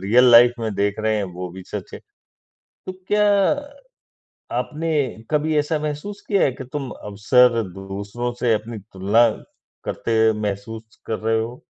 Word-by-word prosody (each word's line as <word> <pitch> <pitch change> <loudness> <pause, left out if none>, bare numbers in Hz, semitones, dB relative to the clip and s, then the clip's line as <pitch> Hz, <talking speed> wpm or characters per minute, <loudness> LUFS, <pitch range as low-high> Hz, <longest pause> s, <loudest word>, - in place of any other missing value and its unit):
Real 125 +5 +5
life 120 0 +7
में 110 -3 -2
देख 100 +1 0
रहे 110 0 +1
हैं, 105 - -1
वो 90 0 -6
भी 95 +1 -10
सच - - -7
है, - - -7 0.9
तो 185 - -4 0.2
क्या 210 0 +3 1.3
आपने 160 +2 -3 0.4
कभी 155 +1 +1
ऐसा 150 +1 0
महसूस 150 +7 -5
किया 200 -3 +3
है 135 - +3
कि 130 - -8
तुम 140 -4 -4
अक्सर 115 +4 +2
दूसरों 100 +5 -5
से 120 -2 +3
अपनी 110 +1 -4
तुलना 100 +5 +4 0.6
करते 110 -1 +1
महसूस 110 +2 -5
कर 110 - -2
रहे 110 +1 +1
हो? 120 +3 -6
115 Hz, 155 wpm, -22 LUFS, 105-135 Hz, 1.3 s, life